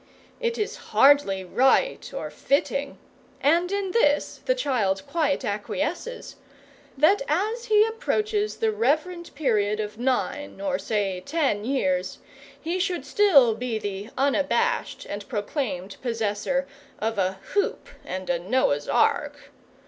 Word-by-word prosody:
It 470 -1 -1
is 425 - -2
hardly 270 -9 +4
right 265 - +2
or - - -5
fitting 280 -1 -1 0.4
and 340 +5 +2
in 400 -2 -1
this 295 -10 +2
the - - +2
child 215 - 0
quite 295 -5 0
acquiesces 210 - -3 0.6
that 320 +9 +4
as 430 +10 -1
he 425 -1 +5
approaches 430 -2 -1
the 450 -1 +1
reverend 345 -4 0
period 215 -7 +1
of 215 +1 -5
nine 265 +3 -1
or 285 -2 -1
say 195 -4 -1
ten 280 -9 0
years, 185 -8 0 0.4
he 340 +3 -2
should 360 -7 -1
still 285 - +5
be 230 0 -3
the 205 0 -5
unabashed 280 +1 0
and 205 0 -6
proclaimed 205 - -3
possessor 230 +3 -1 0.3
of 225 -1 -2
a 185 0 +1 0.2
hoop 405 - 0 0.2
and 185 +1 -5
a 175 -1 0
Noah's 175 - 0
Ark. - - +1
275 Hz, 125 wpm, -25 LUFS, -, 0.6 s, he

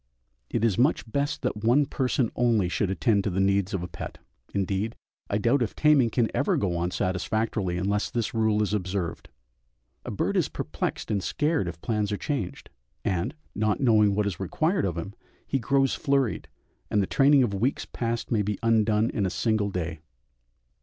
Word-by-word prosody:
It 115 - 0
is 110 -3 +1
much 135 +6 +3
best 140 +1 -1
that 110 -4 -2
one 125 +6 +4
person 130 -3 0
only 115 -6 +2
should 95 +1 0
attend 100 +1 +2
to 105 - 0
the 95 0 -1
needs 100 0 +2
of 95 -3 -2
a - - -4
pet; - - -7 0.3
indeed, 100 +3 -1 0.3
I 100 - +1
doubt 120 +6 +2
if 115 - -1
taming 150 -6 +4
can 115 0 +1
ever - - +2
go 90 -4 0
on 85 +1 0
satisfactorily 95 0 -1
unless 100 +3 0
this 115 -3 -2
rule 110 -2 +2
is 105 - -2
observed; 95 -3 -3 0.7
a - - -6
bird - - -1
is - - +2
perplexed - - -4
and 100 -2 +1
scared 150 - 0
if 85 -1 -6
plans 105 -3 -1
are 105 - -1
changed, 135 - -4 0.3
and, 100 - -1 0.2
not 110 0 0
knowing 110 -6 +4
what 105 0 +1
is 100 -4 -3
required 160 - 0
of 90 -3 -2
him, 85 +4 -5 0.3
he 135 - -1
grows 135 +3 +2
flurried, 140 -4 0 0.4
and 105 - +2
the - - 0
training 140 +5 +5
of 110 -5 -1
weeks 120 +8 0
past 115 -1 -3
may 110 -3 +3
be 105 0 -2
undone 110 -1 +3
in 100 -3 0
a - - -1
single 110 +1 0
day. 85 -4 -3
105 Hz, 185 wpm, -26 LUFS, 95-120 Hz, 0.7 s, training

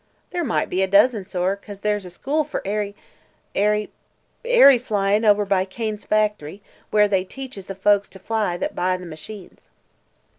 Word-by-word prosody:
"There 350 -1 -2
might 240 - 0
be 185 - -1
a 190 - +2
dozen, 205 +1 +4
sor, 185 +1 -1
'cause 200 0 -12
there's 210 -2 -1
a - - -8
school 280 - -1
for 300 - -5
airy 205 0 -2 0.6
airy 210 +1 +1 0.5
airy 460 - +7
flyin' 210 -2 0
over 205 -1 +4
by 195 -2 +2
Kane's 215 +2 -5
facthry, 210 -4 -1 0.3
where 210 -1 +4
they 195 -2 +1
teaches 250 -2 -9
the 195 - -6
folks 200 +1 +2
to - - -13
fly 205 -2 -1
that - - -3
buy 185 0 0
the 180 - -10
machines." 175 +5 -10
205 Hz, 175 wpm, -22 LUFS, 190-215 Hz, 0.6 s, airy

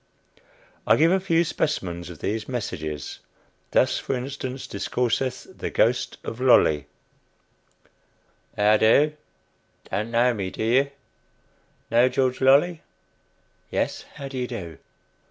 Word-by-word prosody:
I - - +6
give 165 +2 +4
a 190 - +3
few 170 -3 +2
specimens 90 - -2
of 85 - -9
these 110 +6 -3
"messages." 80 - -4 0.5
Thus, - - +2
for - - -2
instance, 130 0 -5
discourseth 125 +5 -2
the - - -4
Ghost - - +1
of 115 - -6
Lolley: 80 - +4 1.7
"How 105 +1 +5
do? 140 +8 +4 0.8
Don't 105 +4 -2
know 120 +1 +3
me, 100 -4 -3
do 110 - -5
you? 130 +5 +3 1.0
Know 120 +2 +5
George 130 0 0
Lolley? 145 +6 +4 0.9
[Yes. - - -2
How 140 - -6
do 135 -1 -5
you 125 - -2
do? 90 -10 -7
125 Hz, 120 wpm, -24 LUFS, 105-135 Hz, 1.7 s, I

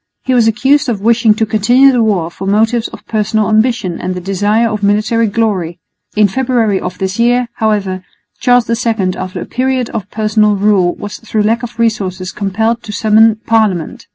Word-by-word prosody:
He 260 - 0
was 235 -3 +3
accused 270 +5 +2
of 220 -4 -2
wishing 225 0 +3
to 220 - 0
continue 240 +6 +4
the 245 -2 +1
war 190 -7 0
from 195 +2 -5
motives 225 +3 +1
of - - -13
personal 215 -1 -1
ambition 220 -5 0
and 185 - -3
the - - -4
desire 205 +5 0
of 215 -2 -3
military 215 +3 +1
glory. 200 -6 -1 0.4
In 210 -1 +4
February 230 -3 0
of 180 0 -6
this 190 +3 -3
year, 240 +1 +2
however, 200 -4 -1 0.4
Charles 245 -2 +3
II 225 -5 -1
after 185 0 -6
a - - -5
period 255 -1 -2
of 210 -4 -5
personal 215 -1 +1
rule 195 -3 +2
was 205 -2 -7
through 220 -2 -2
lack 225 +3 +1
of 240 -1 -8
resources 195 -5 -2
compelled 220 +4 -1
to 215 - -8
summon 220 +1 +3
parliament. 215 -8 0
215 Hz, 180 wpm, -13 LUFS, 200-230 Hz, 0.4 s, continue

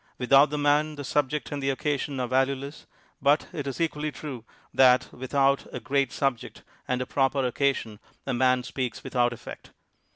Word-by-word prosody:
Without 135 +3 +5
the 150 - -3
man, 150 +1 +2
the 145 - -6
subject 145 +2 -1
and 145 -1 -3
the 135 - 0
occasion 140 0 -2
are 125 - -1
valueless, 135 +3 -1 0.3
but 145 +3 +3
it 145 -2 -4
is 135 - -4
equally 155 -2 -1
true 135 -6 -7 0.3
that, 130 -1 +4
with 130 +3 -7
out 140 0 +3
a - - -5
great 140 -3 0
subject 135 -4 -2 0.2
and 125 0 0
a - - -8
proper 135 0 +1
occasion, 125 -4 -1 0.3
a 135 - -2
man 125 0 +2
speaks 125 -2 -4
without 120 -1 +1
effect. 120 - -10
135 Hz, 175 wpm, -26 LUFS, 130-145 Hz, 0.3 s, Without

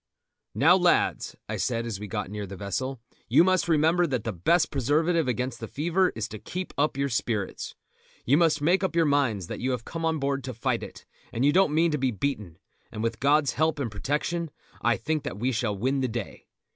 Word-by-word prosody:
"Now, - - +6
lads," - - +2
I - - -3
said 115 -2 -1
as 110 -5 -4
we 105 - -6
got 95 - -4
near 105 -1 -5
the 95 - -8
vessel, 125 +7 -3 0.3
"you 130 +8 +6
must 185 -1 +2
remember 165 +3 +3
that 125 -7 -2
the 115 - -3
best 155 - +2
preservative 160 +4 +1
against 125 -1 -2
the 115 - -6
fever 175 - +1
is 110 - -3
to 110 - -8
keep 185 - -6
up 145 -1 +1
your 140 0 +1
spirits. 115 -5 -2 0.5
You 135 - +4
must 155 -2 +3
make 180 +5 +3
up 190 - -1
your 165 -1 +4
minds 135 - +1
that - - -6
you 130 - -1
have 125 -3 -2
come 165 0 -5
on 160 -1 +1
board 140 -1 -1
to 130 -3 -5
fight 115 - -1
it, - - -10 0.3
and 120 +4 0
you 145 - +4
don't 190 -3 +4
mean 165 +1 +3
to 150 - -1
be 130 0 +1
beaten, 105 - -3 0.3
and 110 - -5
with 115 -1 -2
God's 145 -1 +3
help 160 +3 +1
and 130 -6 -3
protection 150 +9 -2 0.3
I 120 -1 +2
think 155 0 -1
that 145 -5 -5
we 125 +5 0
shall 115 -4 -1
win 130 +6 0
the 130 - +1
day. 115 -3 -6
135 Hz, 220 wpm, -26 LUFS, 115-160 Hz, 0.5 s, Now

